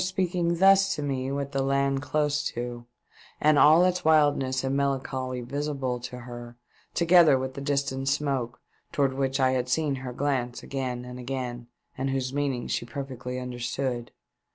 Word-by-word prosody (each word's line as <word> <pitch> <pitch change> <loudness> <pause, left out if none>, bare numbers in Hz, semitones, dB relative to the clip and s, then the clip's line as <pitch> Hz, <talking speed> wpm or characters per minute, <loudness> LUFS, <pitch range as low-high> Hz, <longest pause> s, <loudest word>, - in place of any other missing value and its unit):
speaking 180 -2 0
thus 195 +1 +5
to 150 - -4
me 135 -2 -2
with 140 0 -3
the 135 -1 0
land 135 0 +1
close 150 +1 0
to 120 -3 -5 0.5
and 150 -1 +4
all 160 +4 +7
its 180 0 0
wildness 145 -4 +3
and 135 +1 0
melancholy 130 -2 -1
visible 135 -1 -3
to 125 +1 -7
her, 120 0 -9 0.4
toeether 170 -5 +6
with 130 0 -4
the 140 - -7
distant 140 -1 -1
smoke, 135 -4 -1 0.3
towards 140 -2 +1
which 135 0 -1
I 130 -1 +4
had 125 -1 -1
seen 145 +1 +1
her 130 -1 -6
glance 125 -2 -2
again 125 -3 -4
and 125 0 -8
again, 125 -2 -4 0.3
and 135 +1 -2
whose 135 -1 -2
meaning 140 -4 -1
she - - -1
perfectly 125 0 -6
understood. 125 0 -3
135 Hz, 160 wpm, -27 LUFS, 125-145 Hz, 0.5 s, all